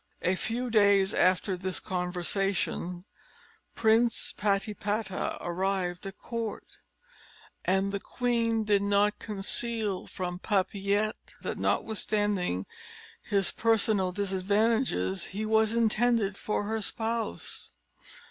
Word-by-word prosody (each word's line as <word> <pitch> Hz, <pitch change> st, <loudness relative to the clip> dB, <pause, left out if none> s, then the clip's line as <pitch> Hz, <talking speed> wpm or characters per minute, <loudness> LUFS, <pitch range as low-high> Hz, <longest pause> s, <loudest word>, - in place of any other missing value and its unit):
A 180 Hz, -, +3 dB
few 235 Hz, +6 st, -2 dB
days 200 Hz, -2 st, +5 dB
after 185 Hz, +1 st, +2 dB
this 185 Hz, +1 st, -2 dB
conversation, 180 Hz, 0 st, -2 dB, 0.7 s
Prince 225 Hz, +1 st, +3 dB
Patipata 205 Hz, 0 st, -1 dB
arrived 180 Hz, 0 st, -2 dB
at 195 Hz, -, -8 dB
court; 230 Hz, -3 st, -5 dB, 0.9 s
and 195 Hz, +1 st, +2 dB
the 200 Hz, -, -2 dB
queen 230 Hz, -1 st, 0 dB
did 205 Hz, -2 st, +3 dB
not 205 Hz, +1 st, +2 dB
conceal 210 Hz, 0 st, -2 dB
from 180 Hz, -1 st, -4 dB
Papillette, 200 Hz, +1 st, 0 dB
that, -, -, -3 dB
notwithstanding 205 Hz, -, 0 dB, 0.6 s
his 195 Hz, -2 st, +1 dB
personal 215 Hz, -4 st, +2 dB
disadvantages, 200 Hz, -, +1 dB
he 210 Hz, +3 st, -4 dB
was 220 Hz, 0 st, +3 dB
intended 230 Hz, -2 st, +2 dB
for 210 Hz, +1 st, -2 dB
her 220 Hz, +2 st, -2 dB
spouse. 225 Hz, +1 st, -3 dB
205 Hz, 100 wpm, -29 LUFS, 190-220 Hz, 0.9 s, days